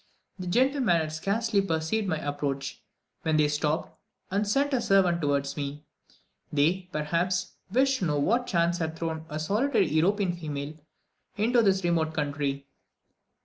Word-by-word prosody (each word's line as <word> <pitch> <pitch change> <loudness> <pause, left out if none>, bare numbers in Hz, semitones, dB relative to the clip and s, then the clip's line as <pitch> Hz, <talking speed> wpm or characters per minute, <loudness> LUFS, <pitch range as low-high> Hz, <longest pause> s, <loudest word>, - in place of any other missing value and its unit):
The 180 - -5
gentlemen 255 0 +3
had 155 -1 -3
scarcely 200 +5 +1
perceived 195 +4 -1
my 160 -4 0
approach, 145 -2 -3 0.4
when 160 -1 +1
they 150 -1 +4
stopped, 150 +1 -1 0.4
and 200 +2 0
sent 280 +7 +1
a 255 - +2
servant 185 -4 +3
towards 140 -1 0
me; 145 0 -5 0.7
they, 170 +6 +1
perhaps, 170 +4 -1 0.2
wished 265 +3 +3
to 185 - 0
know 150 -3 +1
what 235 - +1
chance 170 -1 +1
had 160 -1 -2
thrown 160 -1 -4
a 150 - -4
solitary 205 - +2
European 180 +5 +2
female 150 -3 -5 0.6
into 235 +3 +3
this 195 -3 +2
remote 160 -2 +1
country. 145 -2 -2
170 Hz, 145 wpm, -27 LUFS, 150-200 Hz, 0.7 s, they